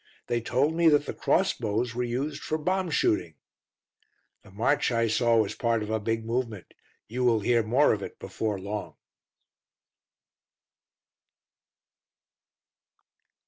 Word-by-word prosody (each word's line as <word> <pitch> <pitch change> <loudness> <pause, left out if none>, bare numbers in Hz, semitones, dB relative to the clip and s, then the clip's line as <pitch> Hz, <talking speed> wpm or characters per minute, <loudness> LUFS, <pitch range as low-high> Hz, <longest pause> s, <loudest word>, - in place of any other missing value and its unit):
They 120 0 -1
told 130 +7 +1
me 170 0 +3
that 145 -1 +3
the - - -4
cross 190 +1 +1
bows 115 +1 -2
were 125 - -2
used 135 +5 -3
for 155 - -2
bomb 185 +3 -1
shooting. 85 - +1 1.1
"The 105 - -18
march 115 +9 +1
I 115 -1 +2
saw 115 +1 +2
was 110 -3 +1
part 115 -2 0
of 105 - -5
a 110 - 0
big 115 +1 -2
movement; 115 -5 -3 0.3
you 125 +4 -3
will 115 -3 +3
hear 120 +2 +3
more 125 +7 +3
of 105 - -3
it - - -7
before 105 -3 -3
long." 100 +2 -5
115 Hz, 135 wpm, -27 LUFS, 110-135 Hz, 1.1 s, me